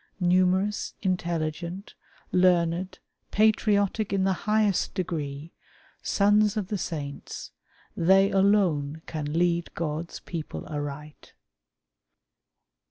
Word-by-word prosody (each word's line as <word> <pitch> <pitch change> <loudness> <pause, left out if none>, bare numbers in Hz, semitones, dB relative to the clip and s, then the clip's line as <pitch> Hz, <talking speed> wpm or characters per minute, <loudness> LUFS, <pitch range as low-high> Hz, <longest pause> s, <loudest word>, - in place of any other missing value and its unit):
Numerous, 185 +3 +2
intelligent, 175 0 -2 0.4
learned, 180 0 +2 0.3
patriotic 210 -1 +2
in 195 -1 +1
the 190 0 +2 0.2
highest 210 -4 +2
degree, 155 -4 -4 0.5
sons 210 +1 +3
of 200 -3 -2
the 210 - -1
saints, 145 -5 -6 0.4
they 195 +3 +4
alone 175 -7 +2
can 150 -2 -4
lead 170 0 +1
God's 165 +1 -4
people 165 -3 -6
aright. 145 0 -7
180 Hz, 90 wpm, -27 LUFS, 160-195 Hz, 0.5 s, they